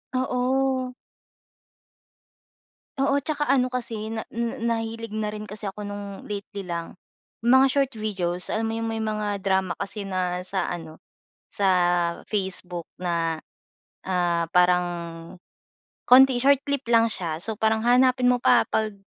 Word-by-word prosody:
Oo. 255 0 0 2.0
Oo 275 +1 +2
'tsaka 295 0 -1
ano 260 -2 +3
kasi 235 -4 -4
na 225 0 -4 0.3
nahilig 230 -1 -3
na 215 -1 -1
rin 210 0 -6
kasi 210 0 -4
ako 205 +2 -7
no'ng 205 -1 -7
lately 200 -1 -6
lang, 170 0 -5 0.5
mga 260 +2 +7
short 275 0 +1
videos 185 -5 -2
alam 220 +1 -1
mo 225 - -2
'yong 225 0 -2
may 225 - -3
mga 215 -2 -2
drama 190 -2 0
kasi 210 +1 -4
na 185 -2 -2
sa 190 +1 -2
ano 160 -2 -6 0.5
sa 200 - -1 0.6
Facebook 185 -4 -3 0.2
na, 165 -2 -1 0.6
ah, 175 -2 +1
parang 180 0 +4 1.2
konti, 260 0 +7
short 280 +1 +4
clip 280 -1 -1
lang 230 -1 +5
siya 170 -7 -3
so 220 +2 -3
parang 220 +1 +2
hahanapin 250 +1 +4
mo 250 - +4
pa 245 - +5
'pag 215 -1 0
215 Hz, 135 wpm, -25 LUFS, 185-250 Hz, 2.0 s, mga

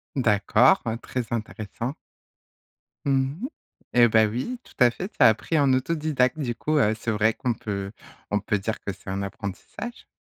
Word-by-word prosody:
D'accord, 115 0 +4
hein, 115 0 -1
très 125 +1 -4
intéressant. 115 +2 -4 1.1
Mmh 135 - 0
mh - - 0 0.5
et 120 -1 +7
bah, 110 0 +5
oui, 130 - -3
tout - - -19
à 125 -2 +6
fait. 180 +10 -5
Tu - - -34
as - - +9
appris 115 +9 0
en 140 -3 +4
autodidacte. 135 -1 +1
Du 125 -5 -1
coup, 155 +6 0
heu, 110 -7 +4
c'est 120 - -3
vrai 110 +1 +2
qu'on 125 0 -1
peut 100 -3 -4 0.4
on 105 - +2
peut 105 +1 -1
dire 110 +3 -3
que 100 - -3
c'est 95 - -12
un 95 +1 -2
apprentissage. 100 - -7
120 Hz, 180 wpm, -25 LUFS, 105-135 Hz, 1.1 s, as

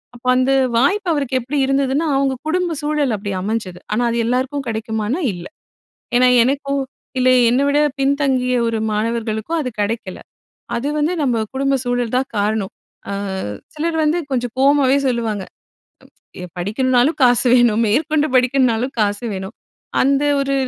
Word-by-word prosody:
அப்ப 245 +1 -16
அந்த 255 +1 +2 0.3
வாய்ப்பு 385 - +2
அவருக்கு 275 -4 -1
எப்படி 260 +5 -4
இருந்துதுன்னா, 275 +3 +1
அவங்க 275 -1 +1
குடும்ப 350 0 0
சூழல் 295 -5 0
அப்படி 200 0 -5
அமைஞ்சது. 195 -3 -3
ஆனா 230 +3 +1
அது 235 - -1
எல்லாருக்கும் 260 +4 -1
கெடைக்குமான்னா, 220 +6 -2
இல்லை. 175 - -9 0.7
ஏன்னா 250 0 +5
எனக்கும், 275 +2 -1 0.4
இல்லை 255 0 +4
என்னை 260 +4 +2
விட 285 +1 +2 0.2
பின்தங்கிய 270 -2 +1
ஒரு 225 -1 -1
மாணவர்களுக்கும் 225 +6 -2
அது 255 - -3
கெடைக்கல. 205 -2 -3 0.6
அது 260 +5 -3
வந்து 310 +4 +1
நம்ம 235 -4 +1
குடும்ப 275 0 +1
சூழல் 245 -1 -1
தான் 265 +1 -1
காரணம். 205 -1 -1 0.4
அ - - -2 0.6
சிலர் 320 +2 -1
வந்து 310 +3 +1
கொஞ்சம் 245 -2 -2
கோவமாவே 275 -1 +4
சொல்லுவாங்க. 225 -5 -1 1.0
எ - - -6
"படிக்கணுனாலும் 250 - +1
காசு 245 0 +4
வேணும். 240 -3 +4
மேற்கொண்டு 300 +6 +1
படிக்கணுனாலும் 255 -1 +2
காசு 205 +2 0
வேணும்." 190 +3 -6 0.5
அந்த 275 +2 +2 0.2
ஒரு 275 0 0
255 Hz, 140 wpm, -19 LUFS, 225-275 Hz, 1.0 s, ஏன்னா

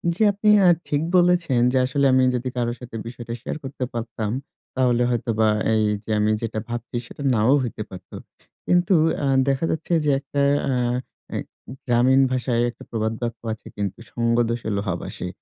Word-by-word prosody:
জি, 195 - -7
আপনি 205 +2 +1 0.2
আ - - +7 0.2
ঠিক 145 0 +1 0.2
বলেছেন, 175 -7 +3
যে - - +3
আসলে 140 +2 +1
আমি 130 0 +5
যদি 125 +1 -2
কারো 120 -1 0
সাথে 125 -2 -10
বিষয়টা 120 0 -7
শেয়ার 135 - -4
করতে 135 -1 -4
পারতাম। 115 -2 -3 0.4
তাহলে 125 -2 +2
হয়তোবা 115 -2 +1 0.3
এই 110 -1 +3 0.2
যে, - - -12
আমি 105 +1 +2
যেটা 115 -1 -3
ভাবছি 120 +1 -5
সেটা 140 - -9
নাও 110 +3 +3
হইতে 115 -3 -5
পারত। 95 -1 -12 0.6
কিন্তু 175 +1 +3 0.3
আ - - +1 0.2
দেখা 135 +3 +1
যাচ্ছে 160 +2 -2
যে, - - +2
একটা 140 +1 -3 0.2
অ্যা 130 -2 0 0.5
আ - - -3 0.5
গ্রামীণ 130 +2 +4
ভাষায় 125 -2 0
একটা 120 - -12
প্রবাদ 110 -1 -1
বাক্য 120 -1 -3
আছে 110 - -12
কিন্তু, 100 -2 -3
"সঙ্গদোষে 115 -1 0
লোহা 100 -3 -1
ভাসে।" - - -6
120 Hz, 170 wpm, -23 LUFS, 115-135 Hz, 0.6 s, আ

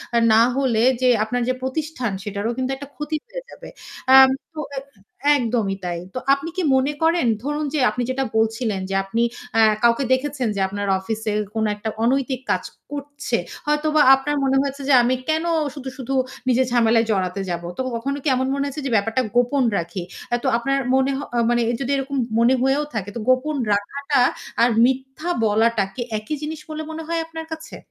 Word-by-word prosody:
আ - - +5
না 220 - +6 0.2
হলে 245 -5 +2 0.2
যে, 255 - +4
আপনার 245 +3 -2
যে - - +2
প্রতিষ্ঠান 260 -3 -2
সেটারও 205 +2 -3
কিন্তু 260 0 -1
একটা 280 +1 -9
ক্ষতি 300 +1 -3
হয়ে - - -7
যাবে। - - -11 0.5
আম 265 0 +9 0.3
তো 305 - -3 0.8
একদমই 225 -6 0
তাই। 175 -1 -2
তো 255 - -3
আপনি 280 +4 -2
কি - - +1
মনে 265 +3 +1
করেন 330 -2 +3 0.2
ধরুন 295 +2 -2
যে 305 - +1
আপনি 250 - -3
যেটা 265 +1 0
বলছিলেন 220 -2 0
যে 195 - -1
আপনি 225 +4 -1 0.3
এ্যা 225 - +6 0.2
কাউকে 235 +3 +4
দেখেছেন 260 -1 -1
যে - - -2
আপনার 200 +1 -4
অফিসে 220 +2 -3 0.2
কোনো 220 -1 +1
একটা 210 +2 -4
অনৈতিক 260 +1 +1
কাজ 185 -2 0 0.3
করছে। 285 0 -3 0.3
হয়তোবা 300 +1 +2
আপনার 280 +2 -2
মনে 270 0 +2
হয়েছে 280 0 -4
যে, - - +5
"আমি 250 +2 +2
কেনো 320 +2 +1 0.2
শুধু, 270 -3 -6
শুধু 265 0 -4 0.3
নিজের 255 +1 +3
ঝামেলায় 230 -1 +3
জড়াতে 190 -1 -1
যাবো?" 170 -1 -3
তো - - -1 0.2
কখনো 275 +4 -2
কি - - -3
এমন 260 +1 0
মনে 280 0 -1
হয়েছে 285 +2 -5
যে, - - -1
"ব্যাপারটা 225 +4 +1
গোপন 245 +3 +3
রাখি?" 170 +2 -4 0.4
তো - - 0
আপনার 275 +3 0 0.2
মনে 265 +1 +2
হ - - -4 0.3
মানে 240 0 +2 0.2
যদি 270 0 -1
এরকম 275 +1 -3 0.2
মনে 235 +3 +5
হয়েও 270 +3 +2
থাকে 205 -3 -3
তো - - -3
গোপন 255 +4 +2 0.2
রাখাটা 250 +7 0 0.4
আর 235 - +5 0.2
মিথ্যা 265 +5 -2
বলাটা 220 0 +3
কি - - -4 0.2
একই 215 +8 -4
জিনিস 305 +1 -4
বলে 310 0 -4
মনে 320 0 -6
হয় 335 0 -1
আপনার 325 0 -7
কাছে? 320 0 -9
260 Hz, 185 wpm, -22 LUFS, 225-285 Hz, 0.8 s, আম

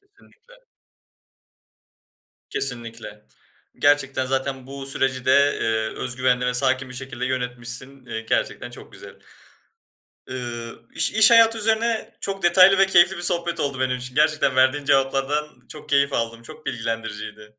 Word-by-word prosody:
Kesinlikle. 405 +4 -24 2.0
Kesinlikle. 115 -4 -4 0.5
Gerçekten 140 -2 +2
zaten 135 0 -3
bu 135 0 -8
süreci 135 -2 -1
de, - - +2 0.3
eee, 110 -1 0
öz 125 -1 -5
güvenli 125 -1 +1
ve 125 - -1
sakin 130 +1 0
bir 125 - -11
şekilde 125 -1 -5
yönetmişsin. 125 +1 -4
İii, 115 -1 -6
gerçekten - - -2
çok - - -12
güzel. - - -12 1.2
Iıı, 120 -3 -6
iş - - +1
iş 220 +1 +6
hayatı 230 -1 +6
üzerine 225 +1 0
çok 195 -1 -4
detaylı 185 +2 +6
ve 195 - +5
keyifli 190 0 +4
bir - - -6
sohbet 170 -1 0
oldu 140 -2 -2
benim 130 -1 0
için. 125 +1 -7
Gerçekten 150 -3 +2
verdiğin 130 +2 +2
cevaplardan 135 +2 +1 0.2
çok 155 - -11
keyif 140 0 +2
aldım, 115 0 -2
çok 155 +5 -13
bilgilendiriciydi. 110 -3 -5
135 Hz, 140 wpm, -22 LUFS, 125-155 Hz, 2.0 s, iş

